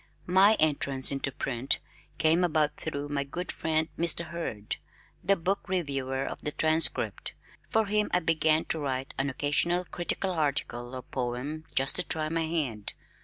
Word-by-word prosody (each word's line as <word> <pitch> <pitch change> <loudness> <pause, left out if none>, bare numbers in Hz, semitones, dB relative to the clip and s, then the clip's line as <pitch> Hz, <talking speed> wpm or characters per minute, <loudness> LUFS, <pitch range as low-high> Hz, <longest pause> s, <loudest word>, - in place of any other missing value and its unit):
My 195 +4 +6
entrance 140 -3 +2
into 135 0 -1
print 130 0 +1 0.4
came 165 +2 +4
about 155 -3 +2
through 145 -2 -4
my 140 -1 0
good 175 +6 -4
friend, 160 0 +1
Mr. 170 0 +1
Hurd, 135 -11 -4 0.5
the 200 - +5
book 195 +3 -2
reviewer 135 -7 -1
of - - -6
the 150 - -1
Transcript. 160 +2 +1 0.3
For 220 0 +3
him 210 +1 +1
I 180 - +4
began 160 -1 +3
to 160 - 0
write 135 -2 -3
an 135 +1 +1
occasional 160 +6 +1
critical 175 +3 -1
article 140 -6 -1
or 130 - -6
poem 130 +6 -4
just 135 +1 +2
to 180 - 0
try 155 -3 +1
my 165 0 0
hand. 135 -11 -2
155 Hz, 160 wpm, -29 LUFS, 135-170 Hz, 0.5 s, My